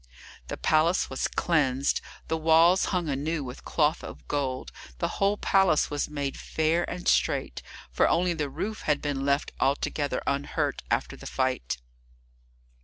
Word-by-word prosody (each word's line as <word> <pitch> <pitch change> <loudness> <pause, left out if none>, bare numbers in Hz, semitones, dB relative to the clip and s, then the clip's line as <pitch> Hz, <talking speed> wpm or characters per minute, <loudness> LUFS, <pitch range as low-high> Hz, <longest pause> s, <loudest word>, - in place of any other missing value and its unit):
The - - -5
palace 160 +2 +2
was 130 - -1
cleansed, 140 -5 +1 0.3
the 160 - 0
walls 165 +3 +5
hung 180 -4 -1
anew 145 +2 -1
with 125 -1 -8
cloth 155 +1 +1
of - - -10
gold, 135 -3 -2 0.3
the - - 0
whole 200 +1 +2
place 195 -9 +3
was 145 0 -1
made 145 -2 -3
fair 160 +2 0
and 180 0 -5
straight, - - +1 0.3
for - - +3
only 175 +1 +2
the 150 -4 -2
roof 215 +9 -4
had 145 -1 +3
been 140 -2 -2
left 140 0 +1
altogether 145 +1 0
unhurt 140 +1 -1
after - - 0
the - - -10
fight. 130 - -1
150 Hz, 150 wpm, -27 LUFS, 140-170 Hz, 0.3 s, walls